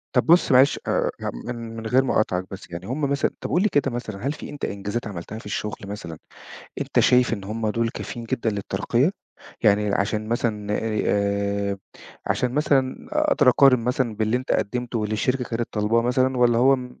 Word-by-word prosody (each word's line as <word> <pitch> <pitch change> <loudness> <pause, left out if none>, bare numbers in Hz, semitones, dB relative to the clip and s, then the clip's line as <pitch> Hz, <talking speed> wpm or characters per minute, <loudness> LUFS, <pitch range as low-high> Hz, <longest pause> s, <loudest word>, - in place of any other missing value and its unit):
طَب - - +3
بُص 170 -1 +5
معلش 130 +2 +5
آآ - - +1
يعني - - -4
مِن 120 0 -4
ِمن 115 -1 -7
غير 130 +3 +4
ما 135 - -1
أقاطعك 90 -4 +1
بس، 95 -2 -9
يعني 85 +2 -6
هُم 130 +5 -3
مثلًا 140 0 +1
طَب - - -4
قُل 180 - +3
لي 215 - +3
كده 140 -5 +1
مثلًا، 120 -1 -5
هل 140 - +1
في - - -9
أنت 145 - -5
إنجازات 100 +4 -4
عملتها 100 +2 -7
في - - -14
الشُغل 105 +1 -3
مثلًا، 100 -5 -7 0.6
أنت - - +1
شايف 125 -1 +4
إن 100 -4 -3
هُم 110 +2 -2
دُول 115 +1 0
كافيين 120 0 -6
جدًا 115 0 -1
للترقية؟ 115 - 0 0.5
يعني 105 -2 +3
عشان 105 +2 -1
مثلًا 105 -3 -1
اي 110 -1 -1
آآ 100 0 0 0.5
عشان 125 -1 0
مثلًا 135 -3 +1
أقدر 300 - +3
أقارن 130 0 +6
مثلًا 125 -3 0
باللي 110 +2 +1
أنت 130 - -2
قدّمته، 120 +2 -1
واللي 105 0 -2
الشركة 125 +4 0
كانت 115 0 -3
طلباه 110 +2 +2
مثلًا، 130 +2 +1
والّا 120 -1 +4
هو 135 +3 +5
م 125 -1 -9
115 Hz, 200 wpm, -23 LUFS, 105-130 Hz, 0.6 s, أقارن